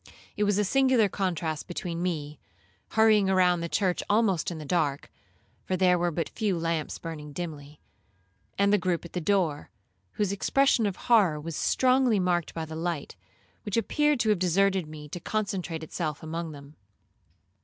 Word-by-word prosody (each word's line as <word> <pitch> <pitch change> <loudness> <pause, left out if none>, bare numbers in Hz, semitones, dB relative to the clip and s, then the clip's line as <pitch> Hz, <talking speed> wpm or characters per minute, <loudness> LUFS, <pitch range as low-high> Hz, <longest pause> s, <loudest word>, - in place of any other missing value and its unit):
It 210 - +1
was 205 -1 +2
a 210 - +3
singular 260 0 +3
contrast 170 -5 -2
between 170 -1 -4
me, 155 -5 -3 0.5
hurrying 220 -2 +5
round 180 -2 +3
the 170 - -3
church 185 -1 0
almost 205 -6 +2
in 170 - -6
the 155 - -7
dark, 145 -3 -1 0.5
(for 185 - -2
there 180 -1 +3
were 175 0 +1
but 165 -1 -3
a - - -28
few 205 -5 -1
lamps 165 -2 -2
burning 150 -3 -8
dimly), 150 -3 -7 0.8
and 200 +1 +3
the 210 - +4
groupe 180 -2 -1
at 170 - -11
the 180 - -2
door, 165 -5 0 0.4
whose 205 -2 0
expression 235 +3 +2
of 195 - -3
horror 200 -11 +3
was 165 +1 -6
strongly 255 -1 +3
marked 175 -2 0
by 165 -1 -3
the 160 0 -8
light, 165 -2 -3 0.5
which 205 +1 -3
appeared 295 +4 +2
to 220 - +1
have 210 -4 +3
deserted 190 0 +2
me 150 -1 -9
to 175 - -6
concentrate 180 -5 -3
itself 155 -2 -4
among 165 +1 -4
them. 140 0 -13
180 Hz, 175 wpm, -27 LUFS, 160-205 Hz, 0.8 s, hurrying